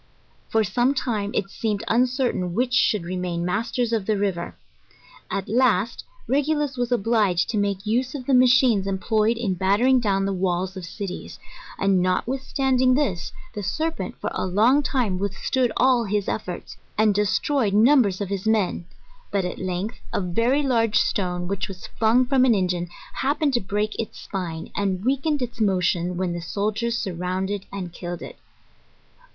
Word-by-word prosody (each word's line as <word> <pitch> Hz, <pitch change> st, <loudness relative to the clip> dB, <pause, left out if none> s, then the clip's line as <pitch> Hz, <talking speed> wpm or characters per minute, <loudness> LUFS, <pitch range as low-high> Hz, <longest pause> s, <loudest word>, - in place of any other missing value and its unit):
For 220 Hz, 0 st, +2 dB
some 245 Hz, +7 st, +1 dB
time 215 Hz, -6 st, -1 dB
it 195 Hz, -1 st, -1 dB
seemed 215 Hz, -2 st, -2 dB
un 245 Hz, +3 st, +3 dB
certain 245 Hz, -9 st, -1 dB
which 250 Hz, +2 st, 0 dB
should 210 Hz, -6 st, +3 dB
remain 175 Hz, -1 st, -3 dB
masters 230 Hz, +5 st, -1 dB
of 215 Hz, -4 st, -1 dB
the 215 Hz, -1 st, +2 dB
river. 190 Hz, -4 st, -2 dB, 0.7 s
At 195 Hz, -, -3 dB
last, 235 Hz, -2 st, +2 dB, 0.2 s
Regulus 290 Hz, 0 st, +1 dB
was 245 Hz, -1 st, -2 dB
obliged 210 Hz, -6 st, +2 dB
to 215 Hz, -, 0 dB
make 200 Hz, 0 st, -1 dB
use 250 Hz, +5 st, 0 dB
of 260 Hz, -3 st, -6 dB
the 275 Hz, -, +1 dB
machines 250 Hz, -5 st, +5 dB
employed 215 Hz, +3 st, +1 dB
in 220 Hz, -5 st, -1 dB
battering 205 Hz, +8 st, +3 dB
down 195 Hz, -4 st, +1 dB
the 195 Hz, -, -1 dB
walls 185 Hz, 0 st, -1 dB
of 185 Hz, -2 st, -6 dB
cities: 195 Hz, 0 st, -6 dB, 0.4 s
and, 195 Hz, -2 st, +2 dB
notwithstanding 255 Hz, +6 st, +1 dB
this, 245 Hz, -, -1 dB, 0.2 s
the 205 Hz, -, -4 dB
serpent, 315 Hz, -, -2 dB
for -, -, -3 dB
a -, -, -2 dB
long 225 Hz, +10 st, +4 dB
time, 240 Hz, -10 st, 0 dB
withstood 215 Hz, +5 st, 0 dB
all 250 Hz, -2 st, +4 dB
his 205 Hz, -1 st, -1 dB
efforts, 180 Hz, -5 st, -5 dB, 0.2 s
and 215 Hz, -1 st, +4 dB
destroyed 210 Hz, +2 st, +1 dB
numbers 220 Hz, -4 st, +4 dB
of 200 Hz, -, -3 dB
his 200 Hz, +1 st, -3 dB
men; 210 Hz, -5 st, +1 dB, 0.4 s
but 195 Hz, -2 st, 0 dB
at 180 Hz, -, -4 dB
length, 185 Hz, +4 st, -3 dB
a -, -, 0 dB
very 230 Hz, +10 st, +1 dB
large 230 Hz, -5 st, +2 dB
stone, 180 Hz, -4 st, 0 dB
which 200 Hz, 0 st, -2 dB
was 190 Hz, -2 st, -9 dB
flung 230 Hz, +3 st, +4 dB
from 260 Hz, 0 st, +3 dB
an 245 Hz, -3 st, +5 dB
engine, 180 Hz, -2 st, -1 dB, 0.2 s
happened 285 Hz, +1 st, 0 dB
to 240 Hz, -, +2 dB
break 210 Hz, +2 st, -2 dB
its 225 Hz, -, -4 dB
spine, 170 Hz, -4 st, -5 dB
and 195 Hz, 0 st, -1 dB
weakened 275 Hz, +2 st, +1 dB
its 240 Hz, -1 st, -6 dB
motion, 180 Hz, -3 st, +1 dB
when 180 Hz, -1 st, -1 dB
the 175 Hz, -, -4 dB
sol 205 Hz, +6 st, -1 dB
diers 235 Hz, +2 st, -1 dB
surrounded 190 Hz, -1 st, -3 dB
and 185 Hz, -4 st, -6 dB
killed 175 Hz, 0 st, -6 dB
it. -, -, -10 dB
210 Hz, 170 wpm, -24 LUFS, 185-245 Hz, 0.7 s, machines